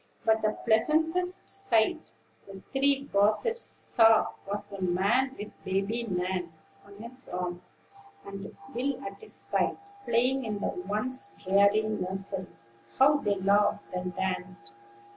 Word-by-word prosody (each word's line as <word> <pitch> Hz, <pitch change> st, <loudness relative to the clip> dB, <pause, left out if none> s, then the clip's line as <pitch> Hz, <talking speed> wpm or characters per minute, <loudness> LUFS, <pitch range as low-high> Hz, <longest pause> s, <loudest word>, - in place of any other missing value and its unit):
But 220 Hz, 0 st, +3 dB
the 215 Hz, 0 st, 0 dB
pleasantest 320 Hz, +10 st, +2 dB
sight 320 Hz, -, 0 dB, 0.3 s
the 195 Hz, -1 st, -11 dB
three 275 Hz, 0 st, +2 dB
gossips 215 Hz, -, +2 dB
saw 225 Hz, -2 st, +4 dB, 0.2 s
was 205 Hz, 0 st, -4 dB
the 200 Hz, -1 st, -7 dB
man 200 Hz, +9 st, +1 dB
with 205 Hz, -, -7 dB
Baby 200 Hz, +5 st, -1 dB
Nan 180 Hz, -1 st, -2 dB, 0.3 s
on 200 Hz, 0 st, -15 dB
his 240 Hz, +5 st, -4 dB
arm 180 Hz, 0 st, -4 dB, 0.6 s
and 200 Hz, 0 st, -8 dB, 0.2 s
Will 255 Hz, +2 st, -1 dB
at 195 Hz, 0 st, -7 dB
his -, -, -5 dB
side, -, -, +1 dB, 0.3 s
playing 255 Hz, +3 st, +2 dB
in 210 Hz, -3 st, -3 dB
the 200 Hz, -, -2 dB
once 215 Hz, -, -4 dB
dreary 200 Hz, +3 st, +3 dB
nursery. 195 Hz, -2 st, -3 dB, 0.5 s
How 290 Hz, +3 st, +6 dB
they 205 Hz, -7 st, 0 dB
laughed 200 Hz, +1 st, +1 dB
and 180 Hz, 0 st, -4 dB
danced! 185 Hz, -10 st, -4 dB
205 Hz, 130 wpm, -29 LUFS, 195-255 Hz, 0.6 s, How